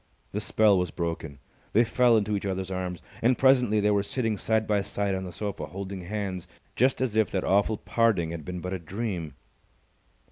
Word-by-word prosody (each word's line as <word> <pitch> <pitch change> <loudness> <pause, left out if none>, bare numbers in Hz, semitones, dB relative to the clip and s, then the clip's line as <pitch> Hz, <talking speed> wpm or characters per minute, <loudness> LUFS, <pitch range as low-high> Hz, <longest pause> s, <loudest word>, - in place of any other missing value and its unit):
The 105 - -2
spell 105 -2 +4
was 90 -1 -1
broken. 80 -4 -4 0.4
They 115 - +6
fell 120 0 +4
into 105 0 0
each 100 0 -2
other's 95 0 -3
arms. 90 -2 -4 0.2
And 120 +1 +3
presently 125 -5 +4
they 105 0 +3
were 100 -1 +3
sitting 115 +1 -1
side 110 +2 +1
by 105 -2 +1
side 100 0 -2
on 95 0 -3
the 90 - -6
sofa, 100 -5 -4
holding 95 +2 -6
hands, 95 -2 -4 0.3
just 130 +2 +2
as 125 -5 0
if 110 -1 +3
that 95 - -1
awful 100 +3 +2
parting 110 -10 +1
had 85 -2 -6
been 90 +2 -5
but 90 +2 -4
a 95 - -3
dream. 90 -2 -4
100 Hz, 200 wpm, -27 LUFS, 90-110 Hz, 0.4 s, They